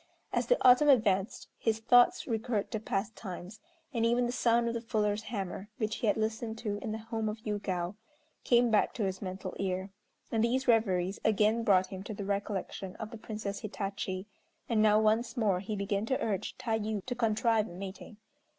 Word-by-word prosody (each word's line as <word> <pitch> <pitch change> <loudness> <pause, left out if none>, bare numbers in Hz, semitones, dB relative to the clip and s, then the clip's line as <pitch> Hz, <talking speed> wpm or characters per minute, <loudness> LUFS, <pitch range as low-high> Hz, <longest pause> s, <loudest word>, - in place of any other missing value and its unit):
As - - 0
the - - +4
autumn 255 +4 +7
advanced 215 -5 +2
his 225 -1 +1
thoughts 245 +2 +5
recurred 225 -3 -1
to 220 - -1
past 205 0 -2
times, 190 +1 -8 0.3
and 230 -2 0
even 240 +1 +3
the 240 - -1
sound 235 -1 +2
of 230 - -1
the 235 - -3
fuller's 215 -2 0
hammer, 205 -2 -5
which 215 -1 -1
he 230 - -1
had 205 - +3
listened 220 +1 -2
to 210 -3 -3
in 215 - -4
the 220 - -2
home 220 0 -3
of 210 - -4
Yûgao, 190 -4 -2 0.5
came 240 -1 +4
back 215 - +2
to 225 - -1
his 190 -1 -2
mental 185 -1 -5
ear; 190 0 -2 0.4
and 225 -1 +2
these 260 +3 +1
reveries 195 -5 +2
again 220 +1 +3
brought 190 -4 +4
him 190 -1 -6
to 205 +2 -6
the 200 - -5
recollection 200 -1 -3
of 215 -1 -7
the 230 - -7
Princess 210 -3 -5
Hitachi, 195 -2 -4 0.4
and 225 -3 +2
now 215 0 +5
once 220 +4 +1
more 205 -6 +2
he 205 +3 -4
began 200 +1 -1
to 260 - +1
urge 205 -4 -2
Tayû 220 -3 -2
to 255 - -2
contrive 225 -1 +2
a - - -11
meeting. 195 +3 -8
215 Hz, 195 wpm, -31 LUFS, 200-230 Hz, 0.5 s, autumn